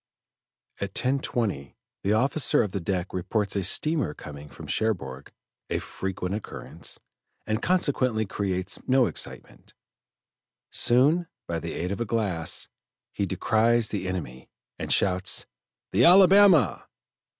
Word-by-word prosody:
At 100 Hz, -1 st, -5 dB
10.20 120 Hz, -, -1 dB, 0.3 s
the 100 Hz, -, +1 dB
officer 135 Hz, +6 st, +2 dB
of 105 Hz, -, -4 dB
the 100 Hz, -, -2 dB
deck 90 Hz, +1 st, -3 dB
reports 100 Hz, +3 st, -1 dB
a 100 Hz, -, +1 dB
steamer 150 Hz, -, +1 dB
coming 75 Hz, 0 st, -10 dB
from -, -, -11 dB
Cherbourg, 70 Hz, -12 st, -2 dB, 0.4 s
a -, -, 0 dB
frequent 95 Hz, -1 st, -4 dB
occurrence, 105 Hz, -, -6 dB, 0.5 s
and 110 Hz, +1 st, -1 dB
consequently 130 Hz, -10 st, +1 dB
creates 95 Hz, -1 st, -2 dB
no 130 Hz, -1 st, +4 dB
excitement. -, -, -5 dB, 1.0 s
Soon, 145 Hz, +8 st, +3 dB, 0.2 s
by 85 Hz, -1 st, -2 dB
the 85 Hz, 0 st, -5 dB
aid 90 Hz, +2 st, -3 dB
of 100 Hz, -, -3 dB
a -, -, 0 dB
glass, 100 Hz, -7 st, -2 dB, 0.5 s
he 100 Hz, -, -1 dB
descries 110 Hz, +5 st, +2 dB
the 95 Hz, -3 st, -3 dB
enemy, 75 Hz, -9 st, -5 dB, 0.3 s
and -, -, -4 dB
shouts: 95 Hz, 0 st, +2 dB, 0.5 s
"The 105 Hz, +6 st, +3 dB
Alabama!" 185 Hz, -, +6 dB
105 Hz, 125 wpm, -26 LUFS, 90-125 Hz, 1.0 s, Alabama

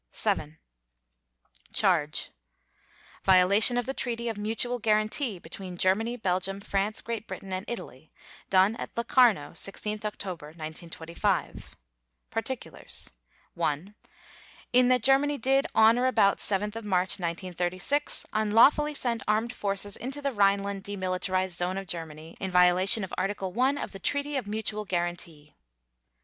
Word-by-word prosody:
VII 160 Hz, -7 st, 0 dB, 1.2 s
CHARGE: 165 Hz, -7 st, +1 dB, 0.9 s
_Violation 195 Hz, +6 st, +5 dB
of 245 Hz, -, 0 dB
the 270 Hz, -, -3 dB
Treaty 235 Hz, -3 st, -3 dB
of 225 Hz, -, -3 dB
Mutual 225 Hz, +4 st, 0 dB
Guarantee 215 Hz, +1 st, +1 dB
between 180 Hz, +2 st, -9 dB
Germany, 220 Hz, +7 st, +1 dB
Belgium, 190 Hz, -1 st, -1 dB
France, 200 Hz, +1 st, -1 dB
Great 230 Hz, -1 st, -5 dB
Britain, 195 Hz, -1 st, -7 dB
and 185 Hz, +1 st, -3 dB
Italy, 155 Hz, -, -7 dB, 0.4 s
done 190 Hz, +3 st, +4 dB
at -, -, -5 dB
Locarno, 235 Hz, -, +3 dB
16 210 Hz, +2 st, -3 dB
October 185 Hz, -7 st, -5 dB
1925._ 165 Hz, +1 st, -3 dB, 0.7 s
PARTICULARS: -, -, -5 dB, 0.4 s
(1) 155 Hz, +7 st, -2 dB, 0.8 s
In 250 Hz, 0 st, +6 dB
that 250 Hz, -2 st, +3 dB
Germany 275 Hz, +3 st, +4 dB
did, 270 Hz, +3 st, +2 dB
on 225 Hz, +2 st, +6 dB
or 255 Hz, -, +2 dB
about 200 Hz, -6 st, +3 dB
7 205 Hz, +1 st, 0 dB
March 185 Hz, -2 st, +1 dB
1936, 180 Hz, -, -2 dB
unlawfully 230 Hz, +8 st, +4 dB
send 235 Hz, -4 st, -1 dB
armed 220 Hz, +3 st, +1 dB
forces 200 Hz, 0 st, -1 dB
into 265 Hz, +5 st, -5 dB
the 280 Hz, -1 st, -1 dB
Rhineland 200 Hz, -2 st, +1 dB
demilitarized 185 Hz, -2 st, -1 dB
zone 180 Hz, +2 st, -1 dB
of 195 Hz, -, -4 dB
Germany, 165 Hz, -2 st, -7 dB
in 190 Hz, -, -3 dB
violation 180 Hz, +4 st, +4 dB
of 190 Hz, -, -6 dB
Article 190 Hz, -1 st, -2 dB
1 260 Hz, +4 st, +2 dB
of -, -, -5 dB
the 195 Hz, -, -9 dB
Treaty 285 Hz, +7 st, -1 dB
of 260 Hz, -6 st, -2 dB
Mutual 215 Hz, 0 st, -2 dB
Guarantee. 175 Hz, -4 st, -4 dB
200 Hz, 130 wpm, -28 LUFS, 180-235 Hz, 1.2 s, In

